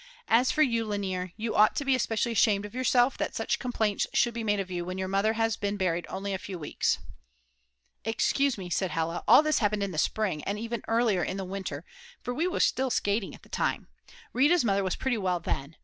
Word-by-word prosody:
As 245 Hz, +3 st, +4 dB
for 310 Hz, -, +3 dB
you, 230 Hz, -5 st, +1 dB
Lainer, 190 Hz, -4 st, -3 dB
you 225 Hz, +1 st, -3 dB
ought 215 Hz, 0 st, +5 dB
to 285 Hz, -, -2 dB
be 270 Hz, -, +3 dB
especially 235 Hz, -2 st, 0 dB
ashamed 205 Hz, -2 st, +3 dB
of 210 Hz, -, -9 dB
yourself 255 Hz, 0 st, +2 dB
that -, -, -2 dB
such -, -, -1 dB
complaints 220 Hz, -5 st, 0 dB
should 240 Hz, -, +3 dB
be 230 Hz, 0 st, -4 dB
made 205 Hz, -2 st, +1 dB
of 190 Hz, -1 st, -4 dB
you 175 Hz, -1 st, -2 dB
when 185 Hz, +1 st, -5 dB
your 190 Hz, 0 st, -2 dB
mother 200 Hz, +3 st, +1 dB
has 225 Hz, 0 st, 0 dB
been 205 Hz, 0 st, -2 dB
buried 175 Hz, -3 st, -1 dB
only 195 Hz, +1 st, -4 dB
a 190 Hz, -, -2 dB
few 190 Hz, -1 st, -7 dB
weeks." 155 Hz, -, 0 dB, 1.1 s
"Excuse 255 Hz, +4 st, +1 dB
me," 185 Hz, -2 st, -6 dB
said 185 Hz, +2 st, 0 dB
Hella, 165 Hz, +1 st, -2 dB
"all 300 Hz, -, +8 dB
this 310 Hz, 0 st, +2 dB
happened 205 Hz, -2 st, +1 dB
in 200 Hz, -, -2 dB
the 155 Hz, -, -2 dB
spring, 190 Hz, -5 st, 0 dB
and 200 Hz, +1 st, -2 dB
even 230 Hz, +1 st, -4 dB
earlier, 225 Hz, -6 st, +2 dB
in 190 Hz, -, -3 dB
the 190 Hz, -, -4 dB
winter, 185 Hz, -5 st, -5 dB, 0.4 s
for 245 Hz, -, -3 dB
we 320 Hz, +8 st, 0 dB
were 365 Hz, -, -2 dB
still 265 Hz, 0 st, +2 dB
skating 205 Hz, -3 st, -1 dB
at -, -, -19 dB
the -, -, -18 dB
time. -, -, -2 dB, 0.4 s
Rita's 295 Hz, +3 st, +4 dB
mother 200 Hz, -2 st, +2 dB
was 185 Hz, -, -1 dB
pretty 250 Hz, -4 st, -1 dB
well 180 Hz, -3 st, 0 dB
then. 145 Hz, -2 st, -4 dB
205 Hz, 225 wpm, -28 LUFS, 190-235 Hz, 1.1 s, all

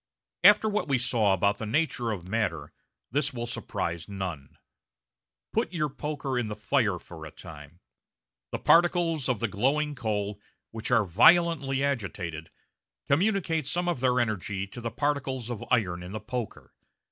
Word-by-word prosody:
After 210 Hz, +1 st, +7 dB
what 210 Hz, 0 st, -1 dB
we 135 Hz, -2 st, +2 dB
saw 115 Hz, -4 st, +2 dB
about 100 Hz, +2 st, +2 dB
the 110 Hz, -, -4 dB
nature 130 Hz, -2 st, 0 dB
of 95 Hz, -5 st, -4 dB
matter, 110 Hz, -1 st, -2 dB, 0.4 s
this 140 Hz, 0 st, 0 dB
will 120 Hz, 0 st, -3 dB
surprise 85 Hz, -6 st, -4 dB
none. 90 Hz, -8 st, -6 dB, 1.0 s
Put -, -, 0 dB
your 155 Hz, -3 st, 0 dB
poker 140 Hz, -2 st, -3 dB
in 120 Hz, -, -2 dB
the 105 Hz, -, -4 dB
fire 110 Hz, -3 st, +1 dB
for 85 Hz, -2 st, -11 dB
a 80 Hz, -, -7 dB
time. 75 Hz, 0 st, -12 dB, 0.7 s
The -, -, -2 dB
particles 170 Hz, -4 st, +3 dB
of 125 Hz, -5 st, +1 dB
the 115 Hz, -, 0 dB
glowing 140 Hz, +9 st, 0 dB
coal, 105 Hz, -5 st, -3 dB, 0.3 s
which 110 Hz, 0 st, -5 dB
are 115 Hz, -4 st, +4 dB
violently 140 Hz, -, +4 dB
agitated, 95 Hz, -, -3 dB, 0.6 s
communicate 165 Hz, -2 st, +1 dB
some 175 Hz, +4 st, 0 dB
of 175 Hz, -7 st, 0 dB
their 125 Hz, 0 st, +2 dB
energy 105 Hz, -3 st, -1 dB
to 120 Hz, -, -9 dB
the 115 Hz, -, -2 dB
particles 130 Hz, -2 st, -2 dB
of 120 Hz, -1 st, -5 dB
iron 90 Hz, -8 st, +1 dB
in 90 Hz, +2 st, -8 dB
the 110 Hz, -, -3 dB
poker. 115 Hz, +1 st, -6 dB
120 Hz, 160 wpm, -28 LUFS, 100-145 Hz, 1.0 s, After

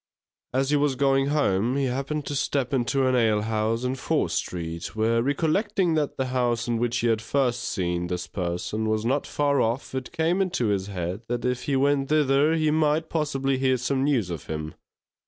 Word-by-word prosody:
As 135 Hz, +2 st, 0 dB
he 150 Hz, -, +4 dB
was 145 Hz, -2 st, +1 dB
going 135 Hz, 0 st, +2 dB
home, 125 Hz, -5 st, +1 dB
he 140 Hz, -, +1 dB
happened 140 Hz, +3 st, -2 dB
to -, -, -4 dB
step 135 Hz, -1 st, -1 dB
into 135 Hz, +1 st, +1 dB
an 130 Hz, 0 st, +2 dB
alehouse 110 Hz, 0 st, +1 dB
in 125 Hz, 0 st, 0 dB
Fore 135 Hz, -, 0 dB
Street, 85 Hz, 0 st, -4 dB
where 115 Hz, +1 st, +2 dB
recollecting 170 Hz, -, +1 dB
that 150 Hz, -2 st, -1 dB
the 130 Hz, -, 0 dB
house 120 Hz, -2 st, 0 dB
in 120 Hz, -1 st, 0 dB
which 120 Hz, 0 st, 0 dB
he 120 Hz, -, +1 dB
had 110 Hz, -1 st, +1 dB
first 120 Hz, +1 st, 0 dB
seen 90 Hz, -2 st, -2 dB
this 90 Hz, 0 st, -3 dB
person, 95 Hz, +4 st, -3 dB
was 110 Hz, 0 st, 0 dB
not 135 Hz, +4 st, 0 dB
far 145 Hz, -1 st, +1 dB
off, 120 Hz, +5 st, -1 dB
it 130 Hz, -1 st, -4 dB
came 170 Hz, +3 st, +1 dB
into 170 Hz, -, 0 dB
his 100 Hz, -1 st, 0 dB
head 90 Hz, 0 st, -4 dB
that 120 Hz, 0 st, -2 dB
if 125 Hz, 0 st, -1 dB
he 140 Hz, -, 0 dB
went 140 Hz, 0 st, +2 dB
thither, 150 Hz, +1 st, +3 dB
he 155 Hz, -1 st, +2 dB
might 155 Hz, +1 st, +1 dB
possibly 135 Hz, -4 st, 0 dB
hear 130 Hz, -1 st, +2 dB
some 130 Hz, +2 st, -1 dB
news 125 Hz, -11 st, +1 dB
of 85 Hz, -5 st, -6 dB
him. 80 Hz, 0 st, -4 dB
130 Hz, 195 wpm, -25 LUFS, 110-145 Hz, -, he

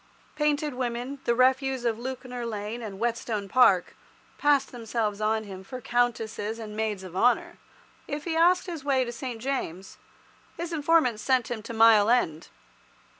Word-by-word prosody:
Painted 300 Hz, -1 st, 0 dB
women, 250 Hz, +2 st, -3 dB
the 235 Hz, -, +2 dB
refuse 260 Hz, 0 st, +2 dB
of 230 Hz, -1 st, 0 dB
Lewkner 250 Hz, -1 st, -5 dB
Lane 220 Hz, +1 st, -4 dB
and 205 Hz, -4 st, -7 dB
Whetstone 225 Hz, -2 st, -2 dB
Park, 195 Hz, -6 st, +4 dB, 0.4 s
passed 285 Hz, -2 st, +3 dB
themselves 225 Hz, -3 st, -3 dB
on 220 Hz, +1 st, +1 dB
him 190 Hz, -2 st, -9 dB
for 255 Hz, +6 st, -7 dB
countesses 225 Hz, -3 st, -1 dB
and 215 Hz, -2 st, -8 dB
maids 215 Hz, -3 st, -2 dB
of 185 Hz, -1 st, -10 dB
honour. 250 Hz, -, +2 dB, 0.5 s
If 290 Hz, +1 st, -4 dB
he 330 Hz, 0 st, -2 dB
asked 350 Hz, +2 st, +4 dB
his 335 Hz, -6 st, -6 dB
way 265 Hz, -3 st, +2 dB
to 240 Hz, -, -5 dB
St. 240 Hz, -1 st, -6 dB
James', 220 Hz, -8 st, -4 dB, 0.6 s
his 340 Hz, 0 st, -4 dB
informants 295 Hz, -8 st, +2 dB
sent 255 Hz, -3 st, +1 dB
him 230 Hz, -2 st, -3 dB
to 230 Hz, -, -8 dB
Mile 220 Hz, -2 st, +6 dB
End. 170 Hz, -10 st, +1 dB
240 Hz, 160 wpm, -27 LUFS, 220-265 Hz, 0.6 s, Mile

